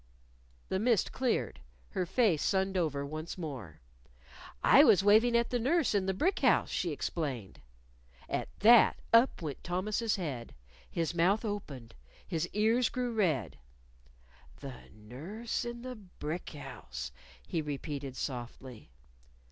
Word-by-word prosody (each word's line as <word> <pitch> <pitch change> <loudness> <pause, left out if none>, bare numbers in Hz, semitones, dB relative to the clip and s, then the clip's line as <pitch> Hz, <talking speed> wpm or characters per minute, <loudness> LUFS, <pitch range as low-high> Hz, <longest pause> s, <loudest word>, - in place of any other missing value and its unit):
The 190 - 0
mist 225 -1 +2
cleared. 225 - -1 0.3
Her 180 - -2
face 195 - +2
sunned 190 0 +1
over 150 -6 0
once 155 +5 -6
more. 135 - -7 0.8
"I - - +8
was 195 - +6
waving 220 +4 +5
at 235 - 0
the 245 - +1
nurse 290 +4 +2
in 195 -2 +1
the 190 - +1
brick 370 - +1
house," - - +3
she 175 - -1
explained. 140 - -4 0.7
At - - -2
that, 230 +2 +7 0.2
up 230 -5 +5
went 145 -4 -5
Thomas's 210 +5 -1
head. 140 -11 -5 0.3
His 165 0 -2
mouth 185 +7 +2
opened. 140 - -5 0.3
His 165 +1 -1
ears 225 +3 +2
grew 250 -2 -2
red. 155 - 0 1.0
"The 135 -3 -9
nurse 160 - -5
in 240 0 -6
the 255 0 -6
brick 180 -4 -6
house!" 65 - -7 0.3
he 165 - -2
repeated 145 -2 -5
softly. 125 - -6
180 Hz, 130 wpm, -31 LUFS, 140-220 Hz, 1.0 s, I